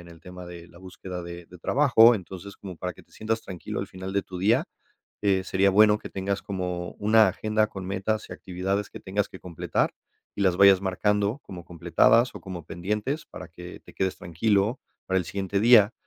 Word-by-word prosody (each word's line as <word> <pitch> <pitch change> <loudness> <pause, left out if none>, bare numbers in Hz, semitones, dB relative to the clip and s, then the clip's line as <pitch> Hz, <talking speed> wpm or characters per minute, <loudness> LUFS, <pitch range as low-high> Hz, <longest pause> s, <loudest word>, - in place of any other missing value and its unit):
en 85 - -13
el 85 -1 -14
tema 90 0 -10
de 85 -1 -10
la 85 - -17
búsqueda 90 -1 -8
de 85 0 -8
de 90 +1 -15
trabajo. 120 - +5
Entonces, 95 0 -8
como 95 -3 -9
para 90 +1 -5
que - - -16
te - - -30
sientas 110 +1 -2
tranquilo 90 -5 -6
al - - -4
final 95 +1 -7
de 100 - +1
tu 90 - -8
día, 105 +6 +3 0.6
eh, 95 -2 +2
sería 95 +1 +3
bueno 105 +2 +5
que - - -9
tengas 100 +1 -3
como 90 -2 -4
una 110 0 +5
agenda 110 +3 0
con 95 -3 -8
metas 100 +3 -2
y - - -6
actividades 95 +2 -3
que - - -10
tengas 100 +1 -2
que 95 - -11
completar 85 -3 -2 0.4
y - - -1
las 95 -2 +2
vayas 100 -1 +7
marcando 105 +4 0
como 90 -2 -9
completadas 115 +8 +3
o - - -8
como 90 -4 -8
pendientes 105 - -3
para 90 - -10
que 90 +1 -11
te - - -17
quedes 95 -1 -1
tranquilo 100 +7 0 0.2
para 95 - 0
el 90 - +1
siguiente 100 0 -2
día, 115 -2 +6
95 Hz, 205 wpm, -26 LUFS, 90-105 Hz, 0.6 s, vayas